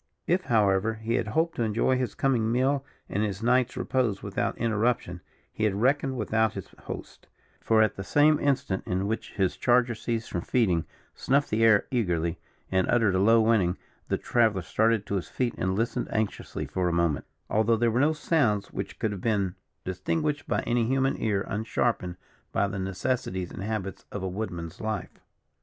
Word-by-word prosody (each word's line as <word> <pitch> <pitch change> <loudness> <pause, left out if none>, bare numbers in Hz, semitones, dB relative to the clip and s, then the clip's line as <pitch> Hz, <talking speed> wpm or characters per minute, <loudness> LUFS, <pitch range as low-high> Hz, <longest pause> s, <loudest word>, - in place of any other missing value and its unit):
If, 180 +2 +1
however, 110 -2 +2
he 110 +1 -3
had - - 0
hoped 160 +9 0
to - - -1
enjoy 115 +3 +2
his 125 -4 -2
coming 120 -5 +1
meal 135 +3 +2 0.2
and 100 - -1
his 105 0 -2
night's 125 +1 +2
repose 120 -7 0
without - - -2
interruption, 110 -5 0 0.3
he 110 - -3
had 100 -2 +1
reckoned 135 +4 +1
without 110 -1 +1
his - - -7 0.2
host; - - -8 0.3
for, 110 -1 +4
at 110 - 0
the 95 - -4
same 150 +7 +4
instant 135 -9 0
in 95 +2 0
which 110 +2 -3
his 95 -3 0
charger 120 0 +3
ceased 115 0 -3
from 85 - -1
feeding, 90 -8 +1 0.3
snuffed 140 +2 +1
the 110 +1 +2
air 110 -3 +5
eagerly, 85 -9 0 0.3
and 95 -1 +2
uttered 115 -5 +3
a 95 - +2
low 115 +3 +5
whining; 105 -5 +2 0.3
the - - 0
traveller 110 -6 +2
started 110 +3 +1
to 100 - -1
his 90 - -4
feet 125 -2 -1
and 95 +1 -1
listened 115 +3 -1
anxiously 110 -2 -2
for 90 -1 -1
a - - 0
moment, 85 -4 +1 0.2
although 110 +2 +2
there 115 0 +2
were 120 +3 +2
so 155 +2 +4
sounds 140 - +1
which - - -5
could 110 - -1
have 100 -3 -6
been 100 -4 0 0.3
distinguished 145 - -2
by - - +1
any 120 -1 +1
human 135 +1 +2
ear 100 -3 0
unsharpened 105 -4 -1 0.4
by 100 - +1
the 100 0 -4
necessities 95 -1 -2
and - - -7
habits 100 -2 -4
of 100 - -5
a - - -1
woodman's 90 -4 -5
life. 110 -3 -4
110 Hz, 185 wpm, -27 LUFS, 95-120 Hz, 0.4 s, air